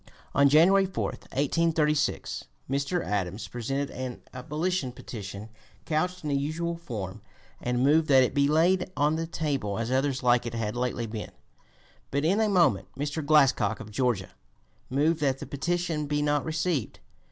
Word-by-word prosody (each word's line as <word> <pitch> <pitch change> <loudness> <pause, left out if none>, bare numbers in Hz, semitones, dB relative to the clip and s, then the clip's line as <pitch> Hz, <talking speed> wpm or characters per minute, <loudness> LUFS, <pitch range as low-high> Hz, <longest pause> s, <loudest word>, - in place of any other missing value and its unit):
On 140 0 +5
January 190 +6 +5
4, 190 - -3 0.3
1836, 150 +1 0 0.2
Mr. 140 +6 -1
Adams 100 0 -2
presented 135 +4 -3
an 130 -1 -6
abolition 150 +3 -2
petition 105 -3 -8 0.4
couched 180 +3 -1
in 150 - -2
the - - +2
usual 160 +4 -1
form, 110 - -6 0.4
and 125 0 0
moved 155 +3 +4
that 135 -2 +6
it 125 - 0
be 140 0 +3
laid 180 +5 +2
on 150 +2 +3
the 165 0 -2
table, 140 -11 -2
as 115 +2 -2
others 135 0 0
like 120 -1 +3
it 115 - -5
had 110 -1 -2
lately 125 -1 -1
been. 110 -1 -6 0.8
But 140 +2 0
in 195 +7 +3
a 215 - +2
moment 170 - +3
Mr. 145 +2 -2
Glascock, 140 -8 +3
of 110 -1 -9
Georgia, 115 -5 0 0.6
moved 155 +5 +2
that 135 -3 +1
the - - -7
petition 165 +1 -2
be 145 0 0
not 145 -1 +1
received. 160 - -1
140 Hz, 160 wpm, -27 LUFS, 125-160 Hz, 0.8 s, that